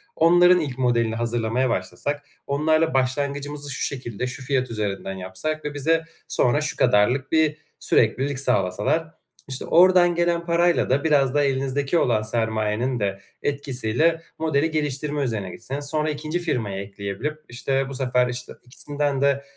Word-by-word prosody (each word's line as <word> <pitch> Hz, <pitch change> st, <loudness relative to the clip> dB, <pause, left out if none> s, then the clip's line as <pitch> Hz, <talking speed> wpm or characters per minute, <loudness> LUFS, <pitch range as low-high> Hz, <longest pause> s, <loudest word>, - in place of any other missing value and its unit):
Onların 175 Hz, +2 st, +6 dB
ilk 140 Hz, -6 st, -4 dB
modelini 120 Hz, -3 st, +1 dB
hazırlamaya 120 Hz, +2 st, 0 dB
başlasak, 145 Hz, +4 st, -3 dB, 0.2 s
onlarla 155 Hz, +3 st, +2 dB
başlangıcımızı 140 Hz, +2 st, -1 dB
şu -, -, -5 dB
şekilde, 125 Hz, -3 st, -3 dB
şu 130 Hz, +1 st, -7 dB
fiyat 130 Hz, -2 st, 0 dB
üzerinden 100 Hz, -3 st, -3 dB
yapsak 95 Hz, +13 st, -5 dB
ve 150 Hz, -, -3 dB
bize 160 Hz, +3 st, +1 dB, 0.2 s
sonra 125 Hz, +5 st, +2 dB
şu 150 Hz, -, -2 dB
kadarlık 125 Hz, +7 st, +3 dB
bir 155 Hz, -1 st, +2 dB, 0.2 s
süreklilik 135 Hz, +1 st, +1 dB
sağlasalar. 130 Hz, -, +1 dB, 0.4 s
İşte, 130 Hz, -1 st, -3 dB
oradan 175 Hz, 0 st, +5 dB
gelen 170 Hz, 0 st, +1 dB
parayla 170 Hz, 0 st, +2 dB
da 135 Hz, +3 st, +2 dB
biraz 140 Hz, -5 st, +3 dB
da 145 Hz, 0 st, +3 dB
elinizdeki 135 Hz, +3 st, 0 dB
olan 120 Hz, -8 st, +2 dB
sermayenin 110 Hz, +2 st, -1 dB
de 100 Hz, -2 st, -2 dB, 0.2 s
etkisiyle 140 Hz, +3 st, 0 dB, 0.2 s
modeli 160 Hz, 0 st, +1 dB
geliştirme 150 Hz, -1 st, -1 dB
üzerine 110 Hz, -7 st, -2 dB
gitseniz. 140 Hz, +9 st, -6 dB
Sonra 155 Hz, +2 st, -1 dB
2'ncisi, 155 Hz, +4 st, -3 dB
firmayı 105 Hz, -, -2 dB
ekleyebilip, 100 Hz, +9 st, -5 dB
işte, 135 Hz, +3 st, -1 dB
bu -, -, -6 dB
sefer, 125 Hz, -1 st, +1 dB
işte, 125 Hz, 0 st, -5 dB
ikisinden 145 Hz, +2 st, -2 dB
de 140 Hz, 0 st, +2 dB
135 Hz, 145 wpm, -23 LUFS, 120-150 Hz, 0.4 s, Onların